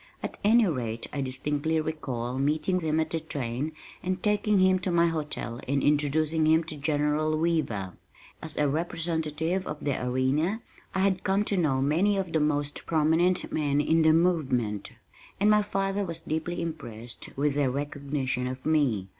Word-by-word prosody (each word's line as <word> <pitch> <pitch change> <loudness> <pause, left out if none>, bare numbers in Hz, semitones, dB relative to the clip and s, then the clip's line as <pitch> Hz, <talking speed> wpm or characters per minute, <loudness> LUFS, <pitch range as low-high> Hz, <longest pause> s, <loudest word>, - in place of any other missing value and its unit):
At - - -5
any 225 +2 +5
rate 120 - -2
I 140 - -2
distinctly 145 +4 -1
recall 130 -6 -3
meeting 155 +6 +1
him 160 -2 0
at 160 0 -1
the 165 - 0
train 140 -2 -3 0.3
and 185 0 -3
taking 210 0 +2
him 185 0 +4
to 185 - -2
my 170 -1 +4
hotel 150 -7 -3
and 140 +1 +1
introducing 150 +2 +2
him 160 +1 +4
to 155 -1 -7
General 150 +1 0
Weaver. 145 - -1 0.5
As 160 -1 -6
a 150 - +3
representative 160 +2 -1
of 150 - -4
the 140 -3 -1
Arena 135 - 0 0.3
I 190 - +2
had 190 -1 +1
come 195 +2 +2
to 205 - 0
know 140 -7 +1
many 180 +8 +2
of 185 -4 -3
the 160 - +3
most 145 -1 -1
prominent 165 +3 +2
men 145 -2 +1
in 160 +2 +3
the 160 0 +5
movement, 135 - +1 0.5
and 210 +2 +4
my 210 0 +5
father 195 0 -1
was 165 -3 -4
deeply 165 +3 -3
impressed 120 -8 -6
with 145 +1 +1
their 140 -2 +1
recognition 140 -2 -2
of 130 +1 -6
me. 135 -12 +2
155 Hz, 170 wpm, -27 LUFS, 140-170 Hz, 0.5 s, any